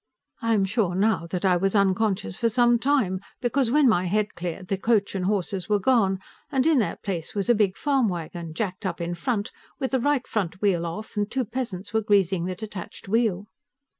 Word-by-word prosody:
I 230 -1 +2
am 195 -2 +2
sure, 195 -3 0
now, 195 -3 +1
that 180 +3 -3
I 180 -2 +4
was 195 +3 0
unconscious 195 - +1
for 230 - +1
some 240 +1 +3
time, 235 -9 +1 0.2
because 255 0 +1
when 290 +2 +4
my 185 -6 +3
head 210 +3 0
cleared, 175 +1 -5
the 195 - 0
coach 210 -2 +2
and 190 -2 -2
horses 195 -1 -1
were 210 - +4
gone, 200 -3 +3 0.3
and 265 -2 +2
in 315 -4 +4
their 220 - 0
place 180 -4 -5
was 200 +2 -1
a - - +6
big 205 -4 +1
farm 275 -5 +2
wagon, 170 -2 -6
jacked 195 -1 -3
up 190 - -3
in 170 0 -2
front, 205 +4 -2 0.3
with 265 -2 -2
the 260 - +2
right 285 0 +1
front 185 -4 -2
wheel 180 -5 +1
off, 215 +8 -7
and 205 0 0
two 260 +1 -1
peasants 210 -4 -5
were 220 - +2
greasing 195 -4 +2
the 185 0 -3
detached 205 -3 -8
wheel. 210 -2 +1
205 Hz, 210 wpm, -25 LUFS, 185-230 Hz, 0.3 s, a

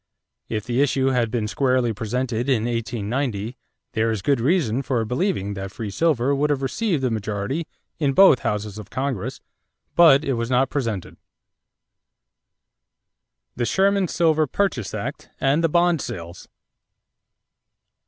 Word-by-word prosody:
If 110 -2 -2
the 120 +2 +1
issue 135 -1 +2
had 125 -3 +1
been 110 -2 -1
squarely 125 0 +1
presented 120 +3 -2
in 120 -5 +2
1890, 115 0 -2 0.4
there 115 -1 +1
is 110 -4 -2
good 140 -5 +2
reason 135 - +1
for 125 -4 -1
believing 125 - -1
that 95 -1 -6
free 105 0 -5
silver 140 -2 +1
would 145 +2 +1
have 140 -2 0
received 165 - -1
a 130 - +1
majority 110 +8 -3 0.3
in 140 -3 +1
both 190 -6 +7
houses 105 0 -3
of 105 - -10
Congress; 130 -5 -3 0.5
but 155 -4 +6
it 135 - 0
was 115 -1 -2
not 130 +1 +2
presented. 115 -10 -3 2.4
=The 120 - -1
Sherman 195 +4 +2
Silver 160 -2 +2
Purchase 135 - -1
Act - - -5
and 140 +5 +2
the 165 - +3
Bond 170 -1 +3
Sales. 85 0 -7
125 Hz, 140 wpm, -23 LUFS, 110-145 Hz, 2.4 s, both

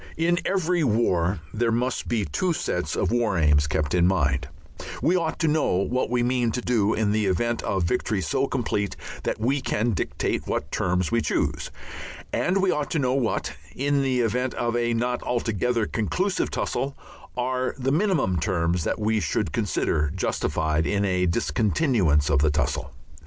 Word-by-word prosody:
In 170 +2 +2
every 180 -3 +1
war 95 - +1
there 115 +1 +1
must 125 +2 -1
be 110 -4 0
two 170 - 0
sets - - -2
of - - 0
War 115 -5 +1
Aims 75 -2 +3
kept 75 -1 -1
in 90 -1 +4
mind; 70 -7 +1 0.5
we 175 - +2
ought 165 -3 0
to 160 - +1
know 155 0 +2
what 115 +8 0
we 120 0 +1
mean 120 -1 +1
to 125 - -2
do 110 -4 +1
in 105 -1 +1
the 105 -1 +1
event 115 +6 0
of 95 -2 -1
victory 95 +4 0
so 135 +8 0
complete 105 -7 -1 0.3
that - - -2
we 130 +5 +1
can 115 0 0
dictate 95 - -2
what - - -2
terms 90 +1 0
we 115 0 +2
choose, - - -1 0.6
and 190 +2 +1
we 190 - +3
ought 150 -1 -1
to - - -1
know 130 -3 +1
what, 130 -4 -1 0.2
in 140 +1 +1
the 130 -2 +1
event 125 +3 0
of 120 0 -1
a 120 -1 +1
not 125 +1 -1
altogether 115 -1 0
conclusive 180 - -1
tussle, 135 +1 -2 0.4
are 130 +1 -1
the 135 0 0
minimum 155 - +1
terms 85 -2 0
that - - 0
we 110 0 +1
should 80 -7 -1
consider 75 -1 0
justified 80 -3 0
us - - 0
in 100 0 +1
a 90 -1 +1
discontinuance 85 - +2
of 70 -2 +3
the 75 +2 +3
tussle. 75 -2 -1
115 Hz, 180 wpm, -25 LUFS, 90-130 Hz, 0.6 s, in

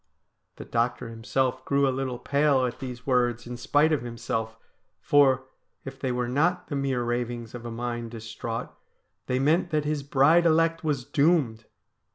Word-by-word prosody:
The - - -9
doctor 120 0 -1
himself 125 +3 -1
grew 140 0 +2
a 130 - +1
little 130 -1 -3
pale 140 0 +2
at 120 -1 -4
these 125 -2 -7
words 120 -3 +1
in 125 0 -6
spite 145 +6 +2
of 155 - +1
himself, 115 -1 -4 0.4
for, 135 -3 +4 0.4
if 135 0 -8
they 130 - -1
were 125 0 -1
not 175 +8 0
the 145 - -3
mere 135 -3 0
ravings 120 -1 -3
of 120 -1 -7
a - - -5
mind 120 0 -4
distraught, 115 0 -6 0.5
they 125 - 0
meant 160 +7 +2
that 155 -2 0
his 150 -1 -1
bride 145 +5 +4
elect 165 +1 +2
was 145 -5 -1
doomed. 140 -7 +2
130 Hz, 170 wpm, -26 LUFS, 120-145 Hz, 0.5 s, for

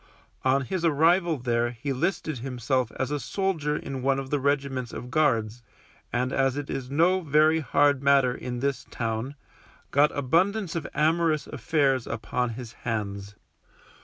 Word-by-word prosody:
On 135 +1 +3
his 180 +6 -3
arrival 165 +2 +3
there 120 -1 0
he 125 +4 -4
listed 155 -1 -2
himself 125 0 -1
as 130 +2 -3
a 145 - -1
soldier 165 -5 -1
in 135 -1 -5
one 135 +1 +2
of 135 -1 -5
the 145 - +1
regiments 135 -3 -1
of 125 - -7
Guards, 120 -7 +1 0.5
and 125 +1 -1
as 135 0 +1
it 145 -1 -4
is 130 -2 -4
no 170 +6 +3
very 155 0 +3
hard 145 -2 +2
matter 140 -3 +4
in 125 -1 -5
this 140 -1 -2
town, 115 +4 -3 0.6
got 145 +2 +5
abundance 175 +7 +1
of 165 -4 -3
amorous 160 0 +2
affairs 135 0 0
upon 125 -1 -2
his 120 -3 -8
hands. 100 -3 -4
135 Hz, 155 wpm, -26 LUFS, 125-155 Hz, 0.6 s, got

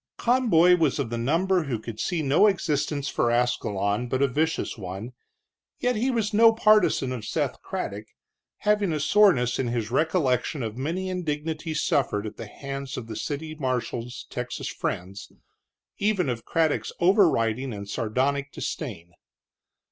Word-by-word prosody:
Conboy 205 -9 +4
was 160 -6 +1
of 115 - -2
the 120 - -2
number 170 +7 +1
who 130 -5 -2
could 110 0 -8
see 170 +2 -1
no 140 +9 +5
existence 150 -6 0
for 120 - +1
Ascalon 120 -2 0
but 130 +3 0
a - - +4
vicious 155 +5 -1
one, 100 +4 -7 0.6
yet 250 0 0
he 240 +5 0
was 225 -4 0
no 225 +2 +7
partisan 210 - +3
of 125 -4 -5
Seth - - -2
Craddock, 105 +2 -5 0.5
having 210 -3 +2
a 155 - -1
soreness 145 - +4
in 130 - 0
his 115 -2 -2
recollection 145 -3 +1
of 110 -1 -4
many 165 +9 -3
indignities 160 -2 -3
suffered 110 -7 +1
at 105 0 -7
the 115 - -7
hands 135 +4 -6
of 125 - -5
the 110 -1 -7
city 155 +5 -4
marshal's 125 -4 -3
Texas - - -4
friends, 95 +3 -5 0.7
even 200 -7 +1
of 115 -2 -4
Craddock's 160 -2 0
overriding 135 - +3
and 100 -2 -6
sardonic 135 +7 -1
disdain. 85 +1 -5
140 Hz, 150 wpm, -26 LUFS, 120-175 Hz, 0.7 s, no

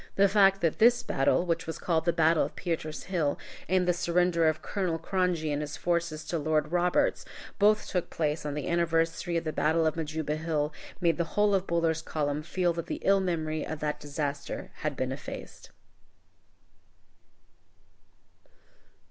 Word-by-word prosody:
The 200 0 +5
fact 195 -1 +4
that 165 -2 0
this 240 +2 +5
battle, 135 +6 +1
which 165 -2 -1
was 160 - -4
called 165 -2 0
the 170 - +4
Battle 165 -1 +3
of - - -5
Pieter's 160 -3 -3
Hill, 165 -6 -1 0.3
and 185 0 +2
the 180 - +4
surrender 175 -1 +2
of 155 - -2
General 185 -5 0
Cronje 170 -3 0
and 145 - -1
his 150 +1 -5
forces 170 -3 -1
to 170 - -2
Lord 155 0 0
Roberts, 175 0 +2 0.4
both 210 +1 +4
took 180 -2 -2
place 155 -1 -1
on 145 -1 -3
the 150 - -3
anniversary 170 0 +1
of 165 - -1
the 155 -1 -3
battle 160 +2 +2
of 155 - +1
Majuba 155 -1 -2
Hill, 155 -2 -1 0.3
made 170 -2 +2
the 170 +2 -3
whole 210 0 +4
of 195 -1 +1
Buller's 165 -1 +1
column 145 -1 -2
feel 175 +2 0
that 170 -1 -5
the - - -4
ill 195 0 +4
memory 160 -4 -1
of 155 - -5
that 150 0 -2
disaster 145 -1 -4
had - - -3
been - - -2
effaced. - - -8
165 Hz, 170 wpm, -29 LUFS, 155-180 Hz, 0.4 s, The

